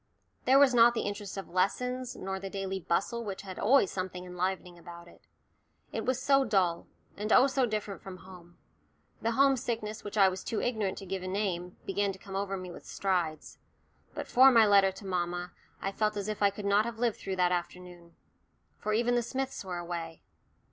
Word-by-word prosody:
There 265 +2 +6
was 275 -2 +6
not 235 0 +6
the - - -1
interest 205 -1 -5
of 195 - -5
lessons, 250 +7 -1
nor 190 0 -4
the 195 0 -6
daily 195 0 -3
bustle 195 +7 -1
which 200 -3 -6
had 190 -2 -8
always 230 -2 +4
something 185 -1 -4
enlivening 180 0 -3
about 170 0 -11
it. - - -18 0.7
It - - -4
was 255 0 +1
so 275 +1 +4
dull, 190 -8 +1 0.3
and 210 +2 -4
oh, 255 - +7
so 265 -2 +1
different 210 -4 -4
from 190 -1 -9
home! 180 -2 -14 0.6
The 230 +1 0
home 275 +2 +5
sickness 225 -4 -4
which 205 +1 -6
I 195 -2 +7
was 190 0 -3
too 225 - -2
ignorant 220 -6 -1
to 195 - -7
give 190 0 -4
a 185 - -5
name 185 -2 -2
to - - -31
began 200 +1 0
to - - -11
come 195 0 -9
over 195 0 -2
me 185 -1 -7
with - - -11
strides; 175 -6 -2 0.6
but - - -5
for 260 +2 +7
my 230 -3 +6
letter 200 -2 +5
to 195 - -12
mamma 175 -1 -2 0.3
I 195 - -1
felt 215 +1 0
as 200 0 -3
if 215 -1 -4
I 200 - +5
could 200 +1 -8
not 200 +2 +3
have 235 -1 -5
lived 235 -2 0
through 190 - -4
that 180 -1 +2
afternoon. 175 -1 -5 0.6
For 215 - -2
even 240 +2 +2
the 240 - +3
Smiths 265 +1 -4
were 185 -2 -5
away. 170 -2 -6
195 Hz, 210 wpm, -30 LUFS, 180-225 Hz, 0.7 s, oh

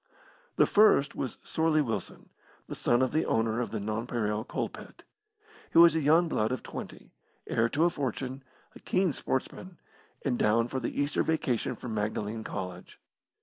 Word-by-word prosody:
The - - +5
first 205 -9 +4
was 130 - -4
Sorley 160 -1 +1
Wilson, 115 - -3 0.4
the - - -6
son 120 +2 +2
of 130 - 0
the 155 +2 +1
owner 115 +1 0
of 115 - -3
the 110 +1 -3
Nonpareil 110 0 -2
Coalpit. - - -6 0.7
He - - 0
was 170 -1 +8
a 160 - +1
young 160 +4 +4
blood 110 -8 0
of 130 - -3
twenty, - - -9 0.3
heir 115 +1 +1
to 145 +6 +1
a - - +4
fortune, 135 -2 -4 0.3
a - - -13
keen 185 -4 +1
sportsman, 170 +8 -4 0.5
and 125 -4 0
down 115 +3 +2
for 130 - -2
the 120 - -4
Easter 145 0 +1
Vacation 125 -6 0
from 115 0 -6
Magdalene 105 +1 -2
College. 90 -3 -7
125 Hz, 165 wpm, -29 LUFS, 110-155 Hz, 0.7 s, was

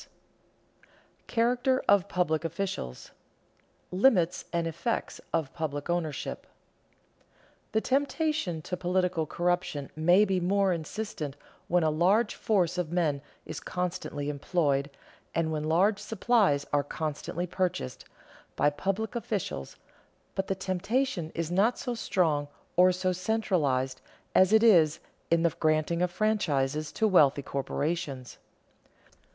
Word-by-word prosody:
[Sidenote: - - -33
Character 250 +3 +1
of 200 -1 +4
public 170 -4 0
officials] 165 - -3
[Sidenote: - - -14 0.9
Limits 180 -9 +3
and 170 -1 0
effects 170 +8 -3
of 160 -5 -1
public 155 -1 -3
ownership] 160 -5 -3 1.3
The 220 - +2
temptation 275 - 0
to 180 - -3
political 180 -2 0
corruption 175 -4 -1
may 175 +6 +5
be 190 -2 +1
more 195 +1 +2
insistent 160 -3 -5 0.3
when 175 0 +2
a 155 - +3
large 195 +8 +3
force 180 -5 +1
of 170 -3 -2
men 160 -6 +1 0.2
is - - -6
constantly 175 -5 -3
employed, 145 -2 0 0.5
and 160 -1 +1
when 155 -1 -2
large 190 +6 +3
supplies 210 -8 +2
are 145 -1 +3
constantly 155 +3 -4
purchased, 180 -7 -3 0.5
by 145 - +3
public 195 +8 -2
officials, 200 - -3 0.6
but 190 0 -2
the 195 - 0
temptation 190 0 -1
is 165 0 -2
not 205 +7 +3
so 245 - -3
strong 160 -10 0 0.3
or 180 +1 +6
so 185 0 0
centralized 165 -10 0 0.3
as 190 +1 +5
it 220 +1 +5
is 170 -9 +6 0.3
in 170 0 +3
the 170 - +3
granting 155 +2 +1
of 180 - +2
franchises 155 -8 0
to 220 - +2
wealthy 145 -8 +4
corporations. 140 -1 -3
175 Hz, 125 wpm, -29 LUFS, 155-195 Hz, 1.3 s, or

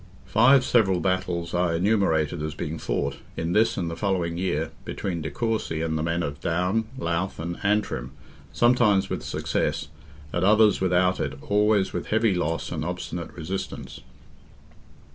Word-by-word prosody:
Five 130 +4 +5
several 95 -7 +3
battles 90 -2 -1
are 90 -1 +1
enumerated 85 -5 +1
as 75 0 -4
being 75 +2 -4
fought, 70 0 -2 0.2
in 80 +1 -2
this 110 +3 +3
and 85 - -1
the 85 - -4
following 85 -2 -1
year, 85 -3 -1
between 90 -4 -4
de 80 - -3
Courcy 110 -3 -2
and 80 -1 -1
the 80 - -1
men 85 +2 0
of 70 0 -4
Down, 90 +6 0
Louth, 85 -1 -2
and 85 +2 -5
Antrim, 100 - 0 0.4
sometimes 120 -5 +3
with - - -2
success, - - -2 0.4
at 85 - 0
others 105 +1 +5
without 90 0 +2
it, 70 0 -3
always 105 -2 +2
with - - -3
heavy 110 -1 +2
loss 85 -2 -2
and 80 -3 -3
obstinate 90 0 -4
resistance. 90 +3 -5
90 Hz, 155 wpm, -25 LUFS, 80-105 Hz, 0.4 s, Five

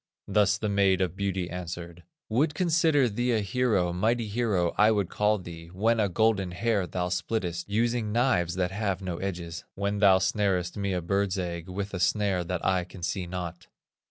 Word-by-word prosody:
Thus 100 -2 +3
the 105 - -2
Maid 100 -2 +3
of 90 -2 -1
Beauty 95 -2 -2
answered: 85 -1 -7 0.3
"Would 145 +7 +1
consider 160 -6 +3
thee 120 +3 0
a 110 - +2
hero, 100 -4 +1
Mighty 110 +5 +1
hero, 105 -6 0
I 105 +1 +5
would 100 -5 +1
call 105 +1 +2
thee, 85 -3 -9
When 110 +6 +1
a 105 -2 +2
golden 100 -2 +1
hair 100 -1 0
thou 90 +1 -2
splittest, 90 0 -2
Using 115 +1 0
knives 105 -8 +1
that 90 0 0
have 100 -2 -2
no 90 -2 -3
edges; 85 -3 -5
When 100 +1 -1
thou 100 -2 +6
snarest 95 -2 0
me 100 -1 -1
a 90 -2 -2
bird's 100 +2 0
egg 85 -1 -4
With 100 +2 -4
a 95 - -3
snare 95 0 +1
that 90 0 -4
I 95 -1 +2
can 90 0 -12
see 90 0 -2
not." 90 -1 -6
95 Hz, 185 wpm, -27 LUFS, 90-105 Hz, 0.3 s, thou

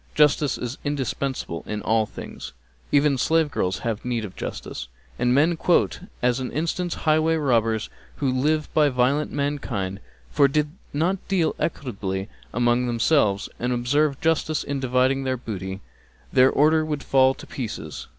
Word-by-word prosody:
Justice 150 -2 +3
is 125 +2 -5
indispensable 135 - -3
in 105 0 -4
all 110 -1 +2
things; - - -9 0.4
even 140 -2 +3
slave 160 +1 +2
girls 90 -7 -1
have 115 -2 -2
need 120 -3 -2
of 95 - -10
justice; 65 - -6 0.3
and 125 0 +2
men 150 +6 +4
quote 175 +2 +2 0.2
as 125 +1 +2
an 130 - -4
instance 170 +3 -1
highway 155 +1 +3
robbers 115 -7 +1 0.3
who 135 -3 0
live 150 +4 +1
by 150 -2 +4
violenting 130 +4 +1
mankind, 135 -10 -2 0.3
for 145 -2 +5
did 150 +2 0 0.2
they - - -5
not 180 +5 0
deal 180 -5 +1
equitably 100 - -3 0.2
among 120 +1 +2
themselves 115 -4 +2
and 125 +1 -1
observe 140 +4 +1
justice 160 -1 +1
in 140 -1 -3
dividing 130 +1 +2
their 130 -1 -1
booty, 95 -4 -6 0.5
their 130 0 +6
order 155 +3 +4
would 150 -2 -3
fall 130 0 +4
to - - -11
pieces. 120 -5 -6
135 Hz, 155 wpm, -24 LUFS, 120-150 Hz, 0.5 s, their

